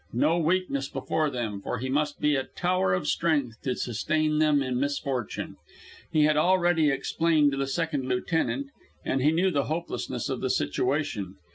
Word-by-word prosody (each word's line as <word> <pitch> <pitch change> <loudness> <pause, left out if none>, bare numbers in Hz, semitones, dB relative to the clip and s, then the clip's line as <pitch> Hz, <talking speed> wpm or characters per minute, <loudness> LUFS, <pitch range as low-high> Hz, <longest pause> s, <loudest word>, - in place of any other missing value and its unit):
No 155 +8 +2
weakness 160 -5 0
before 155 -1 -1
them, 110 -7 -4
for 125 - -3
he 130 +3 -4
must 145 +2 -1
be 150 -1 +2
a 135 - 0
tower 180 - 0
of 95 - 0
strength 145 -9 0
to 130 -2 -1
sustain 155 +6 0
them 150 -2 +3
in 125 -1 -1
misfortune. 140 -4 -3 0.5
He 155 - +3
had 150 0 +3
already 175 -2 +3
explained 150 +2 +2
to 135 - -3
the 135 - 0
second 145 -2 -2
lieutenant, 165 - -1 0.3
and 135 - 0
knew 165 +7 +3
the 140 -4 0
hopelessness 165 +3 -3
of - - -3
the - - -1
situation. 110 - -1
145 Hz, 165 wpm, -27 LUFS, 130-160 Hz, 0.5 s, them